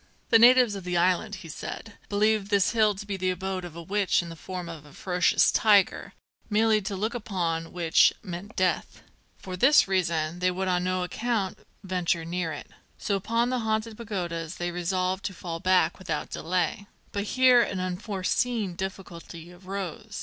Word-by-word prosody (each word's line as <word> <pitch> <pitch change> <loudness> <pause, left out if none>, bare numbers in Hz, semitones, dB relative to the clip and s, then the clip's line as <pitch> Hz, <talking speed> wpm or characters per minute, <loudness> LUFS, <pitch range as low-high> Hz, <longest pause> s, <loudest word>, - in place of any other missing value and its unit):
The 225 - +7
natives 245 -1 +7
of 195 -2 -6
the 180 -1 -1
island, 185 +4 +1
he - - -8
said, 205 +7 -7 0.2
believed 210 0 +1
this 200 -3 +3
hill 215 -3 +3
to 200 +2 -8
be 200 -1 -4
the 185 0 0
abode 185 0 -3
of 175 -2 -8
a 170 - -7
witch 195 0 +1
in 170 - -8
the 165 - -8
form 180 +1 -6
of 165 -3 -8
a 145 -1 -16
ferocious 180 -2 +2
tiger, 205 -4 +3 0.4
merely 215 0 +3
to 200 0 -4
look 215 +4 -2
upon 175 -8 -2
which 165 -4 +4
meant 185 +4 -7
death. 185 -2 -1 0.3
For 185 -1 -7
this 265 +8 +5
reason 170 -3 0
they 180 0 +2
would 185 +1 -2
on 180 -1 +1
no 185 0 0
account 215 0 -2 0.2
venture 180 -3 -1
near 170 -1 -2
it. 145 - -8 0.3
So 200 - -1
upon 230 +5 0
the 255 - 0
Haunted 220 0 -1
Pagodas 175 -7 -4
they 175 0 -3
resolved 185 +2 -1
to 195 - -3
fall 165 -1 -5
back 185 +1 +2
without 160 -5 -4
delay. 180 +4 -2 0.2
But 200 0 -2
here 255 -1 +7
an 200 -5 -2
unforeseen 195 +3 -1
difficulty 175 -2 -7
arose. 195 +4 -6
185 Hz, 180 wpm, -27 LUFS, 175-210 Hz, 0.4 s, The